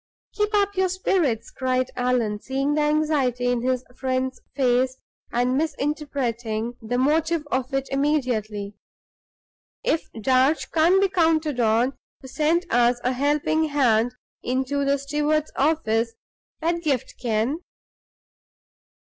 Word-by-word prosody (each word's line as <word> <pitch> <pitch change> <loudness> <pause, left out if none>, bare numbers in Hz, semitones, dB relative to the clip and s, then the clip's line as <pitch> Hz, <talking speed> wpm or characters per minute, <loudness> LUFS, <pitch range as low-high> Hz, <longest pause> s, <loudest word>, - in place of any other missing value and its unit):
"Keep 420 0 0
up 405 -1 +2
your 375 0 +2
spirits!" 335 - 0
cried 255 -1 -1
Allan, 245 -4 0
seeing 275 +2 -1
the 300 - +1
anxiety 295 -5 +1
in 245 -1 0
his 255 0 -1
friend's 260 -1 -2
face, 255 -1 +2 0.3
and 245 +2 +1
misinterpreting 260 -7 -2
the 235 +2 -2
motive 310 +3 +1
of 260 +1 -1
it 270 0 -1
immediately. 245 -8 -1 1.1
"If 320 - -1
Darch 260 +6 +2
can't 335 +4 +4
be 395 - +4
counted 320 -6 +1
on 235 +3 +2 0.3
to - - -8
send 320 +6 +1
us 240 +1 +3
a 250 - +1
helping 295 +4 +1
hand 245 -5 +2 0.3
into 265 +3 -1
the 280 0 +2
steward's 295 +2 0
office, 230 -7 +1 0.5
Pedgift 320 -6 -1
can." 235 +5 0
265 Hz, 120 wpm, -24 LUFS, 245-305 Hz, 1.1 s, can't